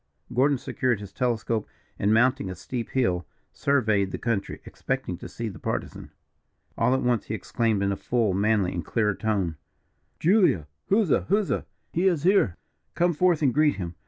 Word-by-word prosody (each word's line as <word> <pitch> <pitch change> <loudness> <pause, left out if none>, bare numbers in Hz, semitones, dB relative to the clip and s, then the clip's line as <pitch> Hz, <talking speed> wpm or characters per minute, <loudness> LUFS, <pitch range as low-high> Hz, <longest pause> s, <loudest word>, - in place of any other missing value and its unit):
Gordon 135 +3 +3
secured 125 -2 -1
his 100 -2 -9
telescope, 115 -2 -1 0.3
and, 100 - +2
mounting 125 0 +3
a 95 - -5
steep 115 +6 -5
hill, 90 -10 0 0.3
surveyed 110 -8 +1
the - - -4
country, 115 -5 -2
expecting - - -3
to - - -8
see 115 - -5
the 100 - -8
Partisan. - - -4 0.7
All 130 - +2
at 130 - -1
once 125 -2 +1
he 110 - -3
exclaimed 110 -3 0
in 100 - +1
a - - 0
full, 115 -2 0
manly, 100 -1 +1
and 85 - -3
clear 105 +4 +1
tone: 95 -6 -1 0.6
"Julia, 180 - +3 0.2
huzza! 200 -5 +2
huzza! 205 +1 +1 0.3
He 180 +3 +2
is 170 -6 +1
here 180 - +3 0.4
come 175 0 +2
forth 170 -1 +2
and 130 -4 +3
greet 150 +2 +3
him. 90 -3 -5
115 Hz, 170 wpm, -26 LUFS, 100-140 Hz, 0.7 s, Gordon